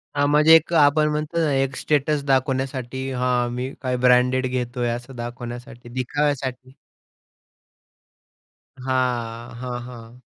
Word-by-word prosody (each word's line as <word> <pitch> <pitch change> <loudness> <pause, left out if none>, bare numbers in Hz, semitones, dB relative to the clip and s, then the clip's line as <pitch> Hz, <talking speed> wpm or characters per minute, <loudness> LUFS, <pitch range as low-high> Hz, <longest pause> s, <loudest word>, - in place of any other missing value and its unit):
हां, 145 0 +2
म्हणजे 150 +2 +6
एक 165 +1 +2
आपण 150 -1 +4
म्हणतो 150 +2 -3
ना, 150 - 0
एक 135 0 0
स्टेटस 150 0 0
दाखवण्यासाठी 130 -1 -1
हां, 125 -1 0
मी 130 +2 -3
काय 125 -1 -1
ब्रँडेड 125 +1 +4
घेतोय 125 -1 -2
असं 120 +3 -5
दाखवण्यासाठी, 120 +1 -8
दिखाव्यासाठी. 130 0 -2 2.0
हां, 125 -3 -2
हां, 125 -1 -4
हां. 120 0 -11
130 Hz, 115 wpm, -23 LUFS, 120-140 Hz, 2.0 s, म्हणजे